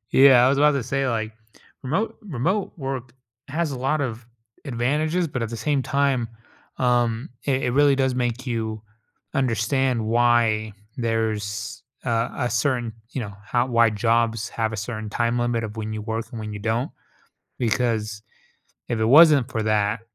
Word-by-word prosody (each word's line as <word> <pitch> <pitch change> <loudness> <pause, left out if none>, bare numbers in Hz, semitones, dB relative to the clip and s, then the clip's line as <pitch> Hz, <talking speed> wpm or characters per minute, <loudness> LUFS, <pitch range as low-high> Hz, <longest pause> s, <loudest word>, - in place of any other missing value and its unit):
yeah, 130 -2 +7
I 130 - +5
was 140 +1 +2
about 150 0 +5
to 140 -3 -1
say, 135 +2 -1
like, 110 -2 -2 0.5
remote 165 - -1
remote 185 - -1
work 135 -3 -4 0.4
has 155 +1 -1
a 130 - -5
lot 140 +4 0
of 120 -3 -4 0.4
advantages, 150 +7 0
but, 130 -4 -3
at 115 - -3
the 115 - -4
same 140 +3 0
time, 135 -4 +1 0.5
um, 120 -2 +1 0.2
it 135 -1 0
it 125 - +1
really 145 0 +4
does 130 -1 +1
make 125 +1 -2
you 110 -3 -3 0.5
understand 130 -1 +1
why 115 -2 +2 0.2
there's 110 -3 -2 0.2
a 115 -1 0 0.2
a - - -2
certain, 120 -1 0 0.2
you 135 - -3
know, 100 -4 -5
how 120 +3 +1
why 115 -2 +4
jobs 115 +1 +1
have 110 -1 -1
a - - -3
certain 110 0 -5
time 120 +2 0
limit 120 -1 0
of 110 0 -6
when 110 0 -4
you 110 - -4
work 110 +1 -3
and 115 -4 -6
when 105 -1 -5
you - - -5
don't, 115 +4 -1 0.7
because 110 -3 0 0.7
if 115 - -1
it - - +2
wasn't 145 -1 +7
for 110 -3 -1
that, 105 +1 +1
120 Hz, 170 wpm, -23 LUFS, 110-135 Hz, 0.7 s, yeah